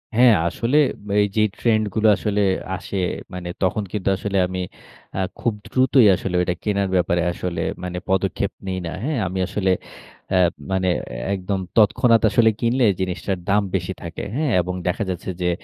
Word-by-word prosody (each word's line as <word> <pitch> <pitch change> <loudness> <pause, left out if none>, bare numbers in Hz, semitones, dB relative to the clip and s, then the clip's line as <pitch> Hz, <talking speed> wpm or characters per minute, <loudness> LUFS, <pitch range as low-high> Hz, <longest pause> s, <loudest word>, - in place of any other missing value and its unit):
হ্যাঁ, 120 -2 +7
আসলে 120 - 0 0.4
এই 105 - +3
যে, 110 - +3 0.2
ট্রেন্ড 110 -2 +2
গুলো 110 0 +2
আসলে 105 -1 0 0.3
আসে, 95 +2 -6 0.4
মানে 90 -1 -5
তখন 100 +3 +1
কিন্তু 100 -2 -1
আসলে 100 -1 -2
আমি 95 0 -4 0.6
আ - - 0 0.2
খুব 120 -4 0
দ্রুতই 130 -1 +4
আসলে, 90 -1 -4
ওইটা 90 0 0
কেনার 100 -2 0
ব্যাপারে 90 -1 +2
আসলে, 85 -1 -3 0.2
মানে 90 0 -4
পদক্ষেপ 95 +1 0 0.2
নেই 95 0 -2
না। 85 - -4
হ্যাঁ? 150 -1 -1
আমি 95 +2 -3
আসলে 95 -1 0 0.6
অ্যা 95 - +3 0.3
মানে 95 -1 +1 0.5
একদম 95 +1 -2 0.2
তৎক্ষণাৎ 115 +2 +5
আসলে 115 0 +4
কিনলে, 120 +1 +2 0.2
জিনিসটার 95 0 -2
দাম 105 +1 +3
বেশি 95 +1 -2
থাকে। 85 -1 -6
হ্যাঁ? 150 -3 0
এবং 90 +1 -4
দেখা 90 +4 0
যাচ্ছে 90 +1 -4
যে, 90 - +2
100 Hz, 165 wpm, -22 LUFS, 90-110 Hz, 0.6 s, হ্যাঁ